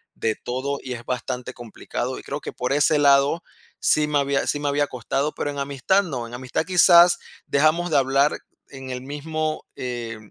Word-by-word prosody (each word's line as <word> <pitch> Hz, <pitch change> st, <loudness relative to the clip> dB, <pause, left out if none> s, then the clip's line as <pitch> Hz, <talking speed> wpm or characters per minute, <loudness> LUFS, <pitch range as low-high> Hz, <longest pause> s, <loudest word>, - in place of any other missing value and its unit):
de 110 Hz, -1 st, -1 dB
todo 135 Hz, +3 st, -4 dB
y 130 Hz, -, -5 dB
es 120 Hz, -1 st, -9 dB
bastante 125 Hz, 0 st, -4 dB
complicado, 120 Hz, +2 st, -5 dB
y -, -, -12 dB
creo 145 Hz, +1 st, -5 dB
que -, -, -6 dB
por 125 Hz, +2 st, -2 dB
ese 150 Hz, +1 st, +3 dB
lado 140 Hz, +4 st, +4 dB, 0.4 s
sí 150 Hz, 0 st, +3 dB
me 150 Hz, -1 st, +1 dB
había 140 Hz, 0 st, 0 dB
sí 145 Hz, -, 0 dB
me 145 Hz, -, -2 dB
había 145 Hz, 0 st, +1 dB
costado, 135 Hz, +4 st, -2 dB
pero 145 Hz, -, -3 dB
en 140 Hz, -, -6 dB
amistad 140 Hz, +8 st, +1 dB
no. 130 Hz, -9 st, -4 dB
En 120 Hz, -, -13 dB
amistad 130 Hz, +5 st, -3 dB
quizás 175 Hz, -1 st, +6 dB, 0.3 s
dejamos 155 Hz, +4 st, +2 dB
de -, -, +4 dB
hablar 135 Hz, +2 st, +2 dB, 0.3 s
en 135 Hz, -1 st, -9 dB
el 125 Hz, 0 st, -5 dB
mismo, 155 Hz, +3 st, -4 dB
eh, 120 Hz, -3 st, -5 dB
140 Hz, 190 wpm, -23 LUFS, 125-150 Hz, 0.4 s, quizás